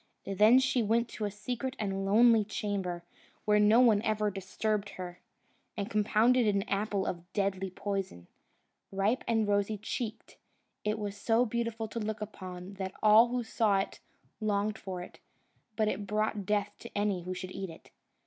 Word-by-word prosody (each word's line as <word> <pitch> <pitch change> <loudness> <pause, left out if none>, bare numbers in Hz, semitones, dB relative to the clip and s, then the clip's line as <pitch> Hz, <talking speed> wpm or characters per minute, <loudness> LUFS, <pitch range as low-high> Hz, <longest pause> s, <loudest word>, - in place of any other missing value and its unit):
Then 210 +5 +5
she 265 -1 +2
went 230 +2 +2
to 215 - -4
a - - -1
secret 245 +6 -4
and 195 -2 -2
lonely 225 +2 +6
chamber, 195 -4 -3 0.4
where 210 -1 +4
no 210 +3 +6
one 220 -5 +5
ever 215 -2 0
disturbed 200 +2 -2
her, 180 -1 -7 0.6
and 205 +2 -3
compounded 220 +3 +3
an 200 -1 +2
apple 200 -1 0
of 175 +1 -5
deadly 195 -2 -1
poison. 190 - -4 0.7
Ripe 195 +6 +1
and 225 -2 +2
rosy 205 +1 +1
cheeked, 220 +2 -5 0.5
it 210 +1 0
was 205 -2 -4
so 225 +3 +2
beautiful 230 -1 -2
to 230 - -5
look 215 0 -3
upon, 185 -3 -7
that 190 0 -4
all 215 +2 +7
who 245 0 -2
saw 220 -3 +2
it 195 - -3 0.4
longed 215 0 0
for 185 -2 -5
it; - - -13 0.6
but 215 -1 +1
it 205 -1 -2
brought 210 -1 -1
death 205 -1 0
to - - -8
any 205 -3 0
who 185 +1 -5
should 185 0 -6
eat 190 -1 -5
it. 165 - -14
210 Hz, 170 wpm, -31 LUFS, 195-220 Hz, 0.7 s, all